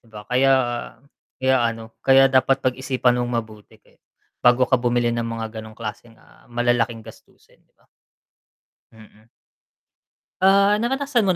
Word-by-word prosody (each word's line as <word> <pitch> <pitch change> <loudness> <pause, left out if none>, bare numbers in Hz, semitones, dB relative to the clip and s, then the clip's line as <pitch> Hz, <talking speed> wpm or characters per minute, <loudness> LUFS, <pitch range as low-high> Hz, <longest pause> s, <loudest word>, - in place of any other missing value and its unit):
'Di 115 - -26
ba 105 -1 -11
kaya, 130 +4 +2 0.8
kaya 130 -1 +1
ano, 115 -1 -3
kaya 135 0 +5
dapat 130 +1 +2
pag-isipan 125 -1 0
mong 120 0 -2
mabuti 105 -1 -17
kaya - - -30 0.4
bago 125 +1 +4
ka 130 -1 +1
bumili 120 -1 0
ng 115 -1 -3
mga 115 -1 -6
ganong 110 0 -13
klaseng 115 +1 -8
ah, - - -24
malalaking 120 -1 -1
gastusin 110 - -18
'di - - -40
ba? - - -33 1.1
Mm. 110 -1 -19 1.2
Ah, 200 +1 +4
naranasan 270 +1 0
mo 195 - 0
120 Hz, 145 wpm, -21 LUFS, 115-130 Hz, 1.2 s, kaya